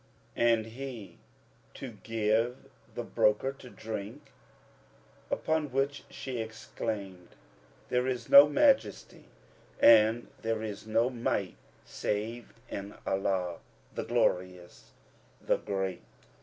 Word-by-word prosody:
And 115 -2 +3
he, 120 -2 -8 0.6
To 130 - -7
give 115 +2 +1 0.4
the - - -3
broker 105 +5 +2
to 135 -2 -13
drink," 110 -3 -7 1.0
upon 160 -3 -1
which 135 +2 -1
she 130 -3 -5
exclaimed, 105 -4 -6 0.5
There 125 +1 +1
is 125 -3 -2
no 140 +1 +9
Majesty 275 - +2 0.5
and 115 +1 +6
there 110 -1 -1
is 105 0 -6
no 115 +3 +2
Might 110 -6 -2 0.3
save 110 +3 -3 0.2
in 100 +1 -6
Allah, 95 -3 -1 0.3
the - - -3
Glorious, 90 -1 -1 0.5
the - - +1
Great!" 95 -3 -3
115 Hz, 100 wpm, -30 LUFS, 100-125 Hz, 1.0 s, no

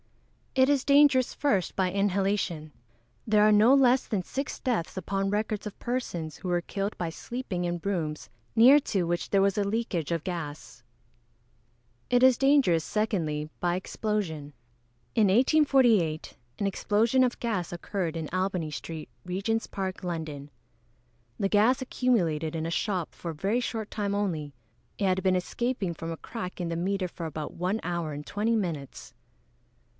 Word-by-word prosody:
_ 265 - +4
It - - +4
is 280 -2 +2
dangerous, 280 -3 +5
first, 200 - 0
by 185 -2 +1
inhalation. 195 -5 0 0.5
There 210 -1 +4
are 215 - +6
no 215 +5 +6
less 265 -1 +4
than 200 -5 -1
six 275 +9 -4
deaths 225 -9 -2
upon 195 +1 -1
record 210 +1 -1
of 205 - -9
persons 175 - -3
who 185 - -5
were 175 0 +2
killed 195 +4 -4
by 170 -2 -2
sleeping 185 0 -4
in 175 0 -2
rooms 165 -6 -2 0.3
near 255 +6 +8
to 195 -8 -1
which 175 0 -2
there 195 -1 +3
was 195 0 +2
a - - +2
leakage 200 -7 -2
of 165 -2 -1
gas. 145 -9 -6 1.3
It 245 0 +3
is 260 -1 +7
dangerous, 270 - +4
secondly, 160 -9 -1
by 175 0 +1
explosion. 185 -7 -3 0.6
In 215 - +5
1848, 240 - +3 0.2
an 200 - 0
explosion 220 +6 +2
of 250 -1 0
gas 210 -8 -2
occurred 175 -1 -3
in 160 -2 -3
Albany 185 -4 -1
street, 160 0 -6 0.2
Regent's 200 +5 -1
park, 190 -1 -4
London. 155 -5 -5 0.9
The 195 - +2
gas 220 +6 +3
accumulated 170 -12 0
in 160 0 -2
a 165 - -3
shop 185 -2 -1
for 170 - -6
a - - -9
very 200 +10 0
short 225 -3 -4
time 200 -1 -1
only. 160 -8 -2 0.4
It 200 - 0
had 185 0 +1
been 185 -1 +3
escaping 200 0 -1
from 165 0 -6
a 165 - -5
crack 190 -3 -7
in 175 -2 -2
the 165 - -2
meter 185 +2 -1
for 170 -1 -6
about 155 -1 -5
one 185 +5 -1
hour 170 -2 -2
and 145 +1 -7
twenty 220 +3 0
minutes. 165 -10 -4
195 Hz, 165 wpm, -28 LUFS, 170-225 Hz, 1.3 s, near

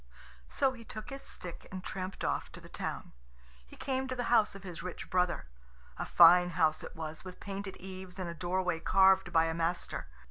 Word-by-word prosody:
So 270 - +2
he 235 -2 -11
took 215 +1 -8
his 275 0 -6
stick 175 -2 -9
and 185 -1 -6
tramped 185 0 -5
off - - -1
to - - -8
the - - -13
town. - - -5 0.5
He - - -13
came 265 -1 -2
to 260 - -3
the 245 - -2
house 220 -4 +4
of 195 - -10
his 180 -3 -7
rich 180 0 -7
brother. 180 -1 +1 0.5
A - - -3
fine 175 +1 +8
house 155 -2 +3
it - - -9
was, 160 -1 -5
with 185 -1 -9
painted 195 -1 -6
eaves 185 0 -9
and 185 -2 -3
a 170 - -4
doorway 180 0 -1
carved 190 +1 +5
by 165 -1 +5
a 165 - -1
master. 165 - -2
185 Hz, 205 wpm, -32 LUFS, 175-195 Hz, 0.5 s, fine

